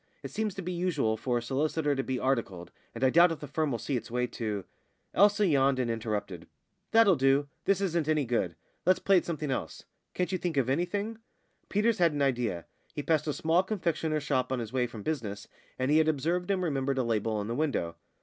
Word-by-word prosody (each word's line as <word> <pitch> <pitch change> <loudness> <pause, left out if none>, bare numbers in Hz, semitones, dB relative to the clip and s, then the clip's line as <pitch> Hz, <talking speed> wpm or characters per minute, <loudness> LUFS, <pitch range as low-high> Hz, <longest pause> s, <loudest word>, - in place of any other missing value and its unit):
It - - -6
seems 215 -3 -2
to 195 - -5
be 180 - -3
usual 165 -11 0
for 120 +2 -1
a 120 - -3
solicitor 145 +4 0
to 135 - 0
be 130 -1 -2
articled, 105 -10 -2 0.2
and 115 - -4
I 130 - +5
doubt 170 +3 +6
if 165 - -4
the 150 - -7
firm 150 +1 -1
will 120 - -1
see 135 +5 -3
its 120 -1 -4
way 125 +1 0
to 105 -5 -4 0.3
" - - -46
Elsa 205 +2 +5
yawned 140 -5 +3
and 125 -2 0
interrupted. 105 -6 -4 0.4
"That'll 225 -5 +6
do. 135 +1 +2 0.2
This 195 0 +2
isn't 170 -5 0
any 155 -2 +2
good. 105 -8 -1 0.3
Let's 185 +1 +4
play 195 -1 +4
at - - +1
something 155 -4 -3
else. 80 -11 -4 0.3
Can't 180 +1 -1
you 185 - -1
think 170 -4 -2
of 130 -1 +2
anything?" 200 +8 -1 0.5
Peters 210 +2 +2
had 170 -3 +4
an 145 - -2
idea. 120 -10 0 0.3
He 145 - -3
passed 155 -1 +1
a - - +1
small 165 +4 +2
confectioner's 165 -6 -1
shop 130 -3 0
on 130 - 0
his 115 -1 -5
way 125 -2 +1
from 115 -3 -9
business, 110 -9 -3 0.3
and 130 +2 0
he 155 - +5
had 160 - +3
observed 170 +5 0
and 190 -2 +1
remembered 140 -4 -1
a 130 - +2
label 110 -2 0
in 100 - -3
the 115 - -2
window. 125 - -1
140 Hz, 225 wpm, -29 LUFS, 120-170 Hz, 0.5 s, doubt